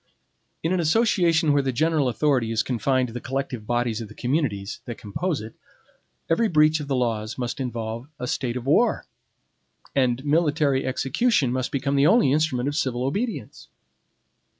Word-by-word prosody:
In 165 +3 +1
an 185 - +1
association 170 -4 +3
where 145 - +3
the 135 -1 -1
general 155 0 +1
authority 125 -3 +1
is 115 0 +1
confined 130 +1 0
to - - -10
the 120 - -5
collective 130 -4 -4
bodies 120 -2 0
of 110 - -6
the 105 - -14
communities, 120 -7 -2
that 120 -3 -6
compose 145 - -3
it, 110 +1 -9 0.7
every 220 +8 +2
breach 155 -3 +4
of 145 - -6
the 135 - 0
laws 115 -3 -1
must 125 +1 -3
involve 115 -1 -4
a 125 - -4
state 125 -1 -2
of 125 - -6
war; 160 - +2 0.9
and 130 0 +1
military 145 -3 +2
execution 135 - +1
must 130 0 -2
become 140 0 -1
the 140 +1 +4
only 215 - +4
instrument 140 -4 +1
of 145 - -2
civil 130 -5 -1
obedience. 205 - -3
135 Hz, 170 wpm, -24 LUFS, 120-155 Hz, 0.9 s, breach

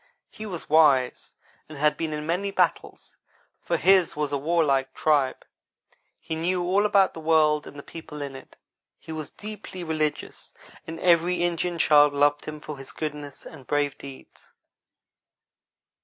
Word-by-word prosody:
He 215 - -8
was 180 -5 -7
wise, 145 -5 +3 0.4
and 155 - -9
had 150 +1 +2
been 160 -1 -3
in 150 0 -4
many 180 +5 -1
battles, 195 - -2 0.4
for - - -1
his 190 -3 +4
was 150 -1 -2
a 140 - 0
warlike 140 -4 +1
tribe. 145 -4 +1 0.7
He - - -6
knew 175 +3 -1
all 195 +4 +2
about 200 -2 +3
the - - -8
world 155 -1 +2
and 145 - -11
the 140 - -8
people 160 -2 -10
in 140 -2 -6
it. 135 - -13 0.4
He 160 - -11
was 155 -2 -5
deeply 210 -3 -9
religious, 155 -2 -3 0.3
and 165 0 -7
every 175 0 +3
Indian 175 0 -1
child 150 -2 +5
loved 145 +1 +2
him 155 0 -7
for 150 -2 -8
his 135 - -9
goodness 150 -2 -6
and 140 -5 -12
brave 145 -1 0
deeds. 135 -1 -13
155 Hz, 155 wpm, -25 LUFS, 145-175 Hz, 0.7 s, child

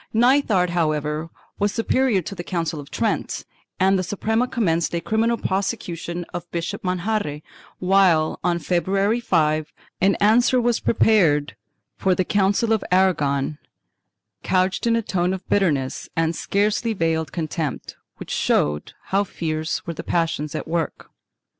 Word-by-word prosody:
Nithard, 230 -7 +3
however, 155 -1 -1 0.3
was 205 0 +2
superior 230 -3 +1
to 170 - -6
the 175 -3 -6
Council 165 -4 -2
of 140 - -10
Trent, - - -2 0.3
and 190 +1 +3
the - - -1
Suprema 220 +6 0
commenced 170 -9 0
a - - +1
criminal 225 +6 +1
prosecution 175 -3 -3
of 175 0 -6
Bishop 175 +6 -4
Manjarre, 180 -4 -2 0.3
while, 180 -4 +3
on 175 -1 +1
February 195 +6 0
5th, 155 -6 +1 0.3
an 195 +1 +4
answer 240 +4 +4
was 240 -1 +1
prepared 170 -11 +3 0.4
for 190 -1 +2
the 185 - 0
Council 205 +4 +2
of 220 - 0
Aragon, 150 -6 +2 0.8
couched 185 +4 +1
in 230 - +3
a 230 - 0
tone 180 -1 0
of 190 - -10
bitterness 145 -10 0
and 165 0 +1
scarcely 210 +3 0
veiled 165 -4 -1
contempt, 160 -3 -4 0.2
which - - -8
showed 75 0 0 0.2
how 195 +1 +2
fierce 160 -4 -3
were 170 - -4
the - - -6
passions 160 -3 -1
at - - -4
work. 165 -2 -3
180 Hz, 140 wpm, -22 LUFS, 160-205 Hz, 0.8 s, an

